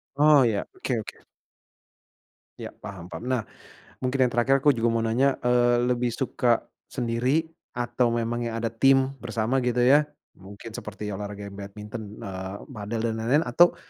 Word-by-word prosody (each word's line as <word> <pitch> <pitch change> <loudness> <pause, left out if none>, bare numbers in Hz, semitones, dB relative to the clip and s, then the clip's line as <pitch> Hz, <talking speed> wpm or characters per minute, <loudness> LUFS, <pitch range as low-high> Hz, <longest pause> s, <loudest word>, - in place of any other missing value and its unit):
Oh, 145 -2 +6
iya. 110 -4 0
Oke 130 - -3
oke. - - -11 1.4
Ya, - - -5
paham 90 -2 -10
paham. 85 +8 -7
Nah, 130 -2 0 0.6
mungkin 130 +1 +1
yang 125 - +1
terakhir, 135 +3 +2
aku 145 - +7
juga 115 -2 0
mau 115 0 +1
nanya, 130 +5 +2
eee, 120 0 +3
lebih 125 0 +1
suka 120 -2 +1 0.2
sendiri 125 +5 0 0.3
atau 120 0 +1
memang 120 +1 -1
yang 115 - -4
ada 115 -1 -2
tim 135 +3 +4
bersama 115 +2 0
gitu 125 -1 +1
ya, 145 +4 +5 0.2
mungkin 100 +4 -11
seperti 105 -1 -6
olahraga 100 0 -6
badminton, 105 +2 -8
eee, 95 0 -5 0.2
padel, 110 0 -4
dan 115 -1 0
lain-lain 130 +8 +2
atau, 170 +9 +4
120 Hz, 155 wpm, -26 LUFS, 105-130 Hz, 1.4 s, aku